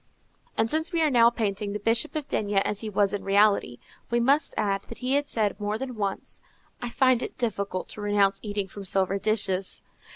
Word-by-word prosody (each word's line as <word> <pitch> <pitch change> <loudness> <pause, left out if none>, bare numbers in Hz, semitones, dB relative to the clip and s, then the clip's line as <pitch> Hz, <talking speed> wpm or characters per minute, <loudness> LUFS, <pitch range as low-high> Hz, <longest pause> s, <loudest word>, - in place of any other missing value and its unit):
And 225 - +2
since 315 +7 -1
we 335 -2 +1
are 305 - +2
now 235 -2 +6
painting 205 -3 -2
the 210 - -3
Bishop 230 +9 +1
of 300 -2 -3
D—— 205 -1 -2
as 195 +1 +1
he 220 - -5
was 200 -1 +1
in 205 - -3
reality, 200 - +3 0.3
we 235 - +1
must 275 +6 +2
add 195 -2 0
that 230 - -8
he 255 +1 -1
had 285 +1 +1
said 210 -3 -1
more 210 +1 -2
than 260 +1 -5
once, 200 -3 -4 0.4
"I 240 - -3
find 255 -1 +3
it - - -6
difficult 200 -5 -2
to 210 - -7
renounce 200 -1 +2
eating 205 -2 -3
from 200 +1 -9
silver 190 +1 +1
dishes." 195 -3 0
210 Hz, 205 wpm, -26 LUFS, 200-240 Hz, 0.4 s, now